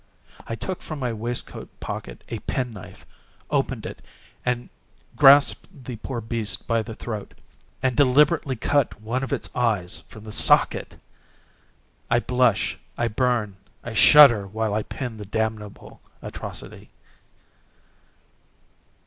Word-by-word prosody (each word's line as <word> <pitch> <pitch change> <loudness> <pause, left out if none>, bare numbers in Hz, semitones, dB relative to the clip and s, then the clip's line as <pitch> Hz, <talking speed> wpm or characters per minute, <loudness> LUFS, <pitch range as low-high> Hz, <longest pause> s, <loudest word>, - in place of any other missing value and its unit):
I 115 - -3
took 185 +9 -5
from 155 - -6
my 125 -4 -2
waistcoat 115 +2 -4
pocket - - -7
a - - -5
pen 125 -2 -3
knife, 95 -2 -12 0.5
opened - - -1
it, - - -7 1.1
grasped 140 +2 +5
the 125 -3 -6
poor 120 +2 -5
beast 110 -1 -3
by 115 -1 +1
the 110 0 -8
throat, 110 -4 -6 0.5
and 130 -2 +1
deliberately 140 +2 +3
cut 140 0 0
one 115 +4 -2
of 135 - -4
its - - -3
eyes 105 -9 0
from 105 - -13
the 110 - -8
socket! - - +3 1.1
I 120 - +4
blush, 125 -3 +1 0.2
I 120 0 0
burn, 115 -4 0 0.3
I 115 - -6
shudder, 120 -3 +7
while 110 +1 -2
I 110 - +1
pen 125 -1 -6
the 105 - -8
damnable 110 0 -4 0.2
atrocity. - - -8
115 Hz, 125 wpm, -24 LUFS, 110-130 Hz, 1.1 s, shudder